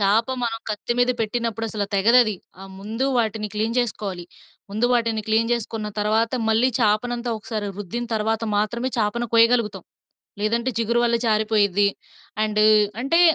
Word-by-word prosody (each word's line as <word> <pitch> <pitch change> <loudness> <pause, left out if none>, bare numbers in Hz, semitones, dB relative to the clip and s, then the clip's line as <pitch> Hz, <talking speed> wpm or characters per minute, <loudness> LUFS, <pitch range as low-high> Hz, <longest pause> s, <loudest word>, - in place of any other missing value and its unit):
చాప 205 +3 +3 0.2
మనం 225 -1 -1
కత్తి 215 +3 -2
మీద 245 0 +3
పెట్టినప్పుడు 225 0 -2
అసలు 205 -2 -2
తెగదు 225 +6 +5
అది. 215 -2 -2 0.3
ఆ! - - -9 0.2
ముందు 225 +6 -2
వాటిని 220 -2 -1
క్లీన్ 220 +2 -1
చేసుకోవాలి. 200 -7 -3 0.5
ముందు 220 +4 +1
వాటిని 230 -2 0
క్లీన్ 225 +1 +2
చేసుకున్న 225 -2 -3
తర్వాత 220 +2 +1 0.2
మళ్ళీ 225 +4 +3
చాపనంతా 235 +3 0
ఒకసారి 215 -1 -4
రుద్దిన 230 +5 -4
తర్వాత 220 +1 -1
మాత్రమే 235 +4 -1
చాపను 225 +3 0
కోయగలుగుతాం. 230 -5 +3 0.6
లేదంటే 230 +4 0
చిగురు 235 +1 +1
వల్ల 235 0 +2
జారిపోయిద్ది. 210 -2 +2 0.6
అండ్ 215 0 +1 0.4
అంటే 330 +6 +3
220 Hz, 145 wpm, -23 LUFS, 210-235 Hz, 0.6 s, తెగదు